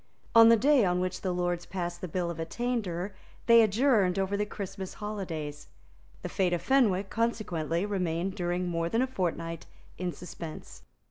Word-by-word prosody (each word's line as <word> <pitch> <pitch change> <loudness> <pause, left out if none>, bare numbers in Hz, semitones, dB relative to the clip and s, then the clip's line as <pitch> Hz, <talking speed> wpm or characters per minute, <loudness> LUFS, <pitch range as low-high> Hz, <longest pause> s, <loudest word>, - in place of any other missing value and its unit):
On 230 0 +9
the 230 - +7
day 270 +2 +4
on 180 -1 +2
which 185 0 -2
the 185 - -1
Lords 175 -1 -1
passed 175 -2 -4
the 185 - -3
Bill 175 +1 -2
of 165 - -8
Attainder, 200 -1 -2 0.3
they 230 0 +8
adjourned 215 -4 +3
over 195 +1 0
the 210 +1 -1
Christmas 195 -2 -6
holidays. 170 -9 -5 0.6
The - - -2
fate 185 -2 0
of 175 - -1
Fenwick 205 -8 +2
consequently 185 -7 -1
remained 185 -2 -1
during 180 -1 -1
more 165 -1 -1
than 230 +5 +2
a - - +2
fortnight 170 -7 -3 0.3
in 180 -1 -1
suspense. 165 -2 -9
185 Hz, 170 wpm, -29 LUFS, 175-210 Hz, 0.6 s, On